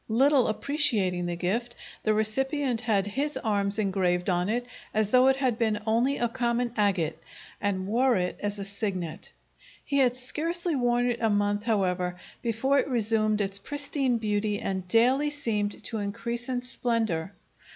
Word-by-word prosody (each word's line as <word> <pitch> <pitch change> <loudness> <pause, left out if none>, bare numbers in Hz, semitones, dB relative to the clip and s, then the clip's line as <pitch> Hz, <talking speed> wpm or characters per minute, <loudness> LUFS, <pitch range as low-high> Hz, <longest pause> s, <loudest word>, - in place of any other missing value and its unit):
Little 265 +3 +4
appreciating 215 - +1
the 175 - -2
gift, 225 +8 -2 0.3
the 215 -1 +1
recipient 255 +3 0
had 210 -5 +1
his 280 +9 -1
arms 200 -2 0
engraved 185 -3 +1
on 180 +2 0
it 240 +2 -1 0.3
as 215 -1 +1
though 255 +1 +6
it 265 - +5
had 260 -4 0
been 220 -2 +1
only 235 +5 +2
a 240 - +1
common 235 0 -1
agate 190 -7 0 0.4
and 190 -2 -1
wore 245 +5 +2
it 180 0 -1
as 205 0 -2
a 200 - -5
signet. 195 -5 -4 0.5
He 280 -1 +1
had 250 -2 +3
scarcely 330 +6 -1
worn 245 -1 +2
it 235 - -4
a 225 - +2
month, 205 0 0
however, 180 -5 0 0.3
before 255 +4 +1
it - - 0
resumed 215 -4 +1
its 195 0 0
pristine 280 0 -1
beauty 210 -1 -1
and 190 -2 -3
daily 255 +8 +3
seemed 215 -8 -2
to 225 - -1
increase 235 +4 -4
in 250 -1 -1
splendor. 220 -8 -1
220 Hz, 160 wpm, -27 LUFS, 200-250 Hz, 0.5 s, though